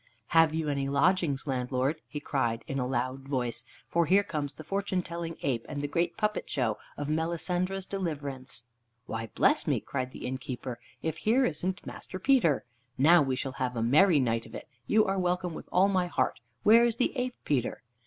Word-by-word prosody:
"Have 165 -1 +5
you 160 -1 -1
any 140 -1 0
lodgings, 150 -1 +2
landlord?" 130 +2 -1
he 150 - -5
cried 120 -6 -1
in 135 - -3
a 125 - 0
loud 130 +1 -2
voice; 120 -3 -1 0.2
"for 170 -1 +2
here 195 +5 +5
comes 150 -7 -4
the 155 - -9
fortune 195 +1 -1
telling 170 -1 -5
ape, 120 -5 0
and 145 - -4
the 145 - -1
great 170 +3 -1
puppet 210 -1 -1
show 115 -6 0 0.2
of 145 - -3
Melisendra's 175 +4 -1
Deliverance." 140 -10 -3 0.4
"Why, 115 -2 -4
bless - - +3
me!" - - +2
cried 130 -2 -3
the - - -8
innkeeper, 125 -1 -5 0.2
"if 160 0 -2
here 245 +8 +3
isn't 185 +4 -2
Master 185 - -7
Peter. 185 - +3 0.3
Now 165 +5 +7
we 135 -2 +1
shall 130 +1 -3
have 125 -1 0
a 115 - 0
merry 155 +7 +5
night 115 -3 0
of - - -11
it. - - -8 0.2
You 215 0 +4
are 195 -1 0
welcome, 180 -1 0
with - - -9
all 185 +2 +5
my 185 -2 +1
heart. 130 -7 0 0.2
Where 230 +3 +7
is 235 -2 +2
the 250 - 0
ape, 250 -1 -2
Peter?" 130 -5 -1
150 Hz, 195 wpm, -29 LUFS, 130-185 Hz, 0.4 s, Now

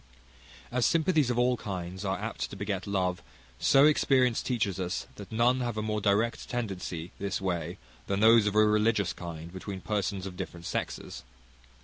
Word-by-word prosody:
As 125 0 +1
sympathies 160 -4 +2
of 120 - 0
all 125 0 +3
kinds 95 -2 -5
are 95 -1 -1
apt - - -4
to - - -8
beget 100 -2 -3
love, 90 -3 0 0.4
so 135 +1 +6
experience 130 -5 +3
teaches 110 -7 -1
us 90 0 -2
that 100 0 -10
none 120 +3 +3
have 120 -3 -2
a 110 - -1
more 105 -1 -1
direct 105 +4 +1
tendency 95 -8 -4
this 100 0 -2
way 90 -3 -2 0.3
than 100 0 0
those 110 0 +6
of 105 - -1
a 110 0 +6
religious 105 -2 +2
kind 85 -1 -8
between 95 +1 -6
persons 100 -1 -2
of 95 -2 -6
different 85 -1 -6
sexes. - - -4
100 Hz, 170 wpm, -29 LUFS, 95-115 Hz, 0.4 s, so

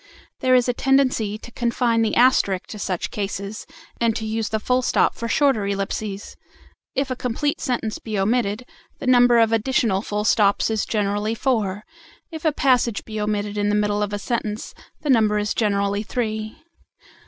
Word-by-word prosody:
There 255 -1 +3
is 250 -1 +3
a 245 - +1
tendency 255 -6 +1
to 240 - -12
confine 235 -1 +1
the 225 - +1
asterisk 235 -7 +3
to 210 - -7
such 185 -3 -3
cases, 200 0 -5 0.3
and 230 -2 +2
to 220 - -3
use 220 -1 -2
the 220 - -1
full 250 +4 +1
stop - - +2
for 235 - -5
shorter 255 -5 +2
ellipses. 200 0 -4 0.6
If 270 0 -1
a - - -1
complete 250 +4 -2
sentence 230 -4 -2
be 215 -2 -4
omitted, 215 +2 0 0.3
the - - -7
number 245 -1 +5
of 225 -1 +4
additional 225 -3 +1
full 210 0 -3
stops 210 0 +3
is 220 -2 -1
generally 210 +1 -1
four; 215 -6 -1 0.5
if 320 0 -8
a 315 - +4
passage 250 -6 +1
be 215 -1 -5
omitted 210 0 -2
in 205 0 +1
the 205 - +2
middle 210 0 +1
of 205 -1 -1
a 205 - -2
sentence, 215 0 -3 0.3
the 295 - +1
number 215 -4 +3
is 210 0 -1
generally 200 -2 0
three. 215 -1 -3
220 Hz, 175 wpm, -22 LUFS, 205-245 Hz, 0.6 s, number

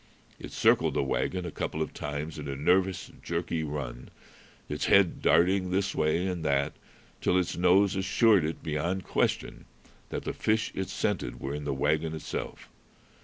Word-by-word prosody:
It - - -8
circled - - +3
the - - +2
wagon 90 +6 -1
a 85 - -4
couple - - -3
of - - -2
times 75 +2 -5
in 75 - -6
a 70 - -3
nervous, 90 +6 +1
jerky 85 -1 -2
run, 70 -5 -5 0.6
its 75 - -2
head 100 -3 +4
darting 90 +2 +3
this 95 +2 0
way 75 +4 +1
and 90 -3 -2
that, 70 0 +1 0.5
till 90 - +2
its 90 -1 0
nose 95 +3 +4
assured 95 +1 +4
it 80 +2 -4
beyond 85 +4 -1
question - - -1 0.4
that - - -4
the - - -3
fish 110 0 0
it 95 -1 -3
scented - - -2
were 70 - -4
in 75 0 -5
the 70 - -1
wagon 75 +3 0
itself. 80 - -6
85 Hz, 170 wpm, -29 LUFS, 75-95 Hz, 0.6 s, head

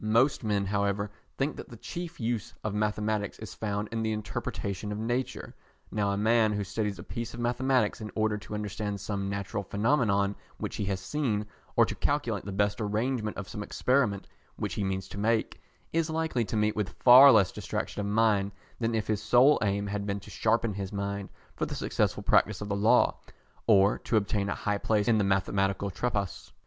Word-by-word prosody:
Most 115 +6 +3
men, 105 -2 +1
however, 100 +1 0 0.3
think 140 +3 -1
that - - -8
the 115 - -10
chief 175 +8 -6
use 115 0 -2
of 110 - -2
mathematics 105 -1 -1
is - - -8
found 105 -1 -3
in 115 0 -2
the 110 -1 0
interpretation 105 -1 -4
of 105 - -3
nature. 120 +4 -3 0.4
Now 105 -1 0
a 100 - 0
man 110 0 +3
who 105 -1 -1
studies 105 +1 -2
a - - -8
piece 115 -1 -5
of - - -8
mathematics 125 -2 +1
in 110 - -5
order 110 -1 +1
to 105 - -7
understand 105 -1 -3
some 100 0 -3
natural 100 0 -3
phenomenon 100 -1 +1 0.2
which - - -4
he 105 - -1
has 95 -1 -1
seen, 105 -1 -1 0.3
or - - +6
to - - -4
calculate - - -1
the 100 - -4
best 100 +2 0
arrangement 110 +1 -1
of 100 - -5
some 105 - -6
experiment 115 -2 +1 0.3
which - - -3
he 105 - -2
means 95 -1 -2
to 100 - -7
make, 110 +1 0 0.3
is 165 0 +1
likely 160 -7 0
to 110 - -3
meet 105 0 +2
with 105 -3 -3
far 130 +3 +10
less 105 -6 +5
distraction - - -4
of 100 - -1
mind 105 -2 +2 0.3
than 115 -1 0
if 110 - 0
his 105 -1 -1
sole 125 +6 +5
aim 100 0 0
had 100 0 -3
been 100 0 -1
to - - -12
sharpen 115 0 +1
his 95 -1 -5
mind 100 -1 -3 0.3
for - - -2
the - - -5
successful - - 0
practice 105 -3 +3
of 105 - -5
the 100 - 0
Law, 105 +3 +3 0.5
or 100 -2 +5
to 115 - 0
obtain 100 -1 0
a - - -1
high 105 -1 -1
place 105 0 +1
in 115 -2 +4
the - - +3
Mathematical 95 0 +1
Tripos. 100 -3 -3
105 Hz, 200 wpm, -29 LUFS, 100-115 Hz, 0.5 s, far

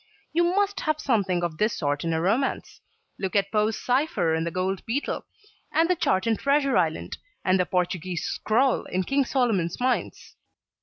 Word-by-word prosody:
You 340 +2 +3
must 405 -1 +1
have 310 -1 -1
something 195 -10 +1
of 165 -2 -3
this 215 +1 +1
sort 145 -2 -1
in 165 - -1
a 160 - +1
romance. 220 +11 -1 0.4
Look 190 0 -3
at 200 -1 +2
Poe's 215 0 +1
cypher 245 - +1
in 160 0 0
the - - -1
Gold 185 +2 -2
Beetle, 260 +6 -2 0.4
and 325 +1 +3
the 365 - +2
chart 190 - +1
in 225 -2 +1
Treasure 280 -1 +2
Island, 165 -3 0 0.3
and 185 0 +3
the 180 - +1
Portuguee's 180 -1 -1
scroll 245 +4 +1
in 185 +1 -1
King 275 +7 +1
Solomon's 220 -11 0
Mines. 255 0 -2
205 Hz, 175 wpm, -25 LUFS, 180-270 Hz, 0.4 s, You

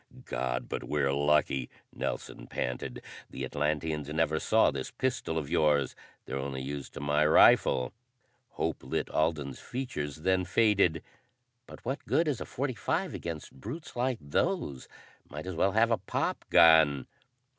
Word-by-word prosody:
"God, 60 -1 -2
but - - -4
we're 70 +2 0
lucky," 70 -3 +2 0.2
Nelson - - -5
panted. 65 0 -4 0.3
"The 65 - -5
Atlanteans 75 +1 -2
never 80 0 +1
saw - - +4
this 65 -2 -4
pistol 125 -10 -2
of 75 -3 -2
yours. 75 -4 +2 0.3
They're 65 +1 -4
only 65 -1 -4
used 70 0 -6
to - - -5
my 75 +1 +2
rifle." 70 -2 +5 0.6
Hope 80 -1 -2
lit 65 - -3
Alden's 75 -4 0
features, 75 - -5
then 95 +2 +2
faded. 95 -3 +3 0.6
"But - - -13
what 135 +4 -3
good 165 - +2
is 145 -6 -1
a - - -3
.45 130 -5 -2
against 85 -3 -6
brutes 150 - -8
like 125 0 0
those? 70 -2 -1 0.4
Might 75 +3 -7
at 95 -2 -4
well 95 +4 +2
have 115 +2 +4
a 115 - +2
pop - - -2
gun!" 80 -5 +6
75 Hz, 145 wpm, -30 LUFS, 70-95 Hz, 0.6 s, gun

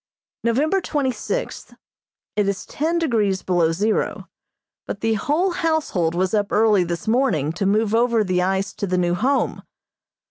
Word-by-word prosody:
November 290 +11 +1
twenty 285 -6 -1
sixth: 470 - -5 0.6
It 210 -1 +1
is 200 -1 -2
ten 325 +4 -1
degrees 220 - 0
below 175 -3 +2
zero, 210 +6 -1 0.6
but 200 - -5
the 225 0 +1
whole 305 - 0
household 310 - 0
was 185 +3 0
up 205 -2 0
early 210 -3 +4
this 170 +1 -5
morning 220 - +1
to 190 +3 -1
move 215 +1 +1
over 230 -1 +3
the 185 -2 0
ice 190 +2 -1
to 200 - -4
the 185 0 0
new 175 -1 +1
Home. 255 +10 0
210 Hz, 155 wpm, -22 LUFS, 185-265 Hz, 0.6 s, early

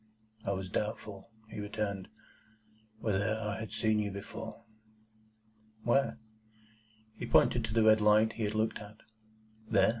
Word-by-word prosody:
"I 100 - 0
was 95 -1 -3
doubtful," 105 +1 -4 0.2
he 110 - -7
returned, 105 -2 -3 0.9
"whether 110 0 +1
I 105 -1 -3
had 110 - -6
seen 110 -1 +2
you 105 -1 0
before." 110 +3 -7 1.2
"Where?" 135 +3 +2 1.0
He - - -4
pointed 120 -1 +4
to 110 - -5
the 115 - +5
red 110 0 +6
light 105 +1 +5
he 115 -2 -2
had 105 +1 -2
looked 110 +1 +1
at. 105 0 -11 0.7
"There?" - - +5
105 Hz, 140 wpm, -32 LUFS, 105-110 Hz, 1.2 s, red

